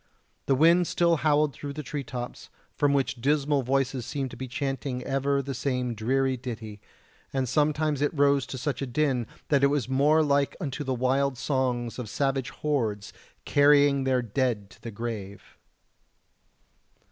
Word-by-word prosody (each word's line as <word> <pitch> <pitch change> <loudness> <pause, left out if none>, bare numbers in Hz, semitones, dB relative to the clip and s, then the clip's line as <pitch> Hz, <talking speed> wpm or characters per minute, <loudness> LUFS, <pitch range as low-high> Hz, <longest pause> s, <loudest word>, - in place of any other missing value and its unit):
The 135 - +4
wind 170 +5 +5
still 170 -1 +2
howled 150 -1 +2
through 140 +3 -7
the 150 +1 -6
tree 145 +2 -4
tops, 120 0 -7 0.3
from 145 -1 +2
which 130 -3 0
dismal 145 +1 +2
voices 135 0 0
seemed 135 0 -4
to - - -9
be 130 - -6
chanting 135 -1 -3
ever 140 +1 0
the 135 +1 -4
same 125 -1 -1
dreary 130 +4 0
ditty, 110 -4 -7 0.5
and 135 -1 -1
sometimes 150 +2 +1
it 145 - +2
rose 140 -3 +2
to 130 - -6
such 130 -1 -3
a 135 - -2
din 125 -3 0 0.2
that 140 -2 +3
it - - +7
was 140 -4 0
more 145 +4 +3
like 140 -1 +1
unto 145 -4 -4
the 130 -2 -1
wild 130 +2 +1
songs 120 -1 -1
of 115 -4 -5
savage 135 +1 -1
hordes 110 -9 -2 0.3
carrying 145 -1 +4
their 130 -2 +1
dead 115 -3 -1
to - - -18
the 115 - -6
grave. 105 -3 -6
135 Hz, 165 wpm, -27 LUFS, 125-145 Hz, 0.5 s, it